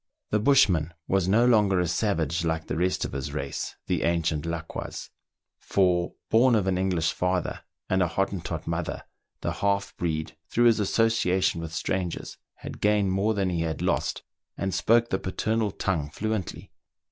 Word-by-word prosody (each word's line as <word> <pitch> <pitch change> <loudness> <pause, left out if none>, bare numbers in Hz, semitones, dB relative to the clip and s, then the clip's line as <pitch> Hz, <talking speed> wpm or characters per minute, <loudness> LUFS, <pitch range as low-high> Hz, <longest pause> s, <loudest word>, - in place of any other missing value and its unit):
The 105 - +3
bushman 95 - +3
was 95 -2 +1
no 110 +5 +4
longer 105 -6 +4
a 90 - +1
savage 85 -3 0
like 80 -1 -1
the - - -3
rest 90 +3 0
of - - -5
his 65 -1 -4
race, 70 0 -4
the - - 0
ancient 85 -2 0
Laquas; 85 0 -5 0.5
for, 90 -2 +1 0.2
born 120 +2 +5
of 105 -4 +2
an 95 -1 +1
English 90 -3 +1
father 90 -1 -1 0.3
and 95 0 +1
a 90 - +3
Hottentot 95 +1 -2
mother, - - -3 0.4
the - - -1
half 100 0 -1
breed, 80 -2 -2
through 120 - +2
his 115 -2 +5
associa 105 -3 +2
tion 85 - +1
with 80 -1 -6
strangers, 90 +1 -3 0.2
had - - -9
gained 105 -2 +3
more 100 +3 +1
than 95 -2 0
he 85 -2 -1
had 80 -1 -2
lost, - - 0 0.3
and 95 -1 -2
spoke 115 +1 +3
the 95 - +1
paternal 110 +3 -1
tongue 85 -7 -2
fluently. 110 +2 -4
95 Hz, 170 wpm, -26 LUFS, 85-105 Hz, 0.5 s, born